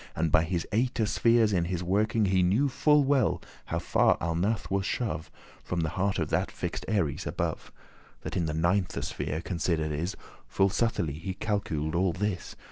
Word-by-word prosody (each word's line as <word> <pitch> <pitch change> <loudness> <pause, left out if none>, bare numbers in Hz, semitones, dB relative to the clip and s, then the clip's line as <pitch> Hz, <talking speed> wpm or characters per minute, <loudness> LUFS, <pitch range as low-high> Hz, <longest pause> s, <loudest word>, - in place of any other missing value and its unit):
And 80 0 0
by 80 - +4
his 85 0 -2
eighte 115 0 +1
spheres 115 -1 +3
in 85 -2 +2
his 90 0 -2
working, 105 +4 +2
He 95 -1 +3
knew 105 +11 +3
full 150 +2 +4
well 135 -4 +2 0.3
how - - -2
far - - +3
Alnath 85 +7 -1
<20> - - -18
was 100 0 +1
shove 110 -10 -2 0.3
From 90 -1 -2
the 80 - 0
head 95 +1 0
of - - -2
that - - +1
fix'd - - -5
Aries 80 -10 0
above, - - -3 0.5
That - - -5
in 85 -3 0
the 75 - -2
ninthe 90 +3 +1
sphere 80 - -3
consider'd 85 -3 -1
is. 80 +6 -3 0.3
Full 95 0 +2
subtilly 90 - -1
he 95 +3 -4
calcul'd 95 -8 -2
all 90 0 +2
this. 95 -1 -3
95 Hz, 185 wpm, -28 LUFS, 85-105 Hz, 0.5 s, by